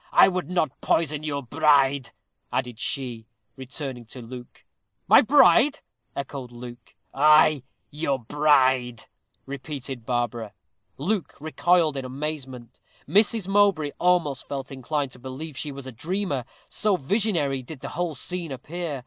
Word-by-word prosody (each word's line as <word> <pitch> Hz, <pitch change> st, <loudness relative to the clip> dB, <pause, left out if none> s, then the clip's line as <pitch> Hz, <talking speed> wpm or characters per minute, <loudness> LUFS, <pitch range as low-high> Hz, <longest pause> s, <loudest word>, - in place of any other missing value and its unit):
"I -, -, +7 dB
would 185 Hz, -1 st, -3 dB
not 160 Hz, -6 st, -1 dB
poison 155 Hz, -2 st, +1 dB
your 145 Hz, -2 st, -3 dB
bride," 140 Hz, -2 st, +3 dB, 0.4 s
added 125 Hz, -3 st, -2 dB
she, 120 Hz, -6 st, -3 dB, 0.4 s
turning 135 Hz, -4 st, -6 dB
to 125 Hz, -, -11 dB
Luke. 125 Hz, +1 st, -11 dB, 0.4 s
"My -, -, +8 dB
bride!" 270 Hz, -, +5 dB, 0.3 s
echoed 135 Hz, -2 st, -5 dB
Luke. 120 Hz, 0 st, -11 dB, 0.2 s
"Ay, 150 Hz, 0 st, +5 dB, 0.3 s
your 145 Hz, -2 st, -1 dB
bride," 130 Hz, -2 st, +2 dB, 0.4 s
repeated 135 Hz, -2 st, -6 dB
Barbara. 120 Hz, -2 st, -2 dB, 0.4 s
Luke 185 Hz, +6 st, -2 dB
recoiled 160 Hz, 0 st, +2 dB
in 135 Hz, -, -3 dB
amazement. 130 Hz, -3 st, -6 dB, 0.3 s
Mrs. 210 Hz, -1 st, +3 dB
Mowbray 195 Hz, -7 st, +3 dB
almost 175 Hz, -7 st, +1 dB
felt 135 Hz, -1 st, -5 dB
inclined 135 Hz, +1 st, -2 dB
to 125 Hz, -, -12 dB
believe 135 Hz, +4 st, -7 dB
she 145 Hz, +2 st, -4 dB
was 140 Hz, -1 st, -9 dB
a 130 Hz, -, -7 dB
dreamer, 155 Hz, -, -2 dB, 0.2 s
so 210 Hz, -3 st, +1 dB
visionary 160 Hz, -, 0 dB
did 135 Hz, +2 st, -10 dB
the -, -, -5 dB
whole 170 Hz, 0 st, -2 dB
scene 175 Hz, +2 st, -5 dB
appear. 150 Hz, +3 st, -5 dB
140 Hz, 130 wpm, -25 LUFS, 130-165 Hz, 0.4 s, My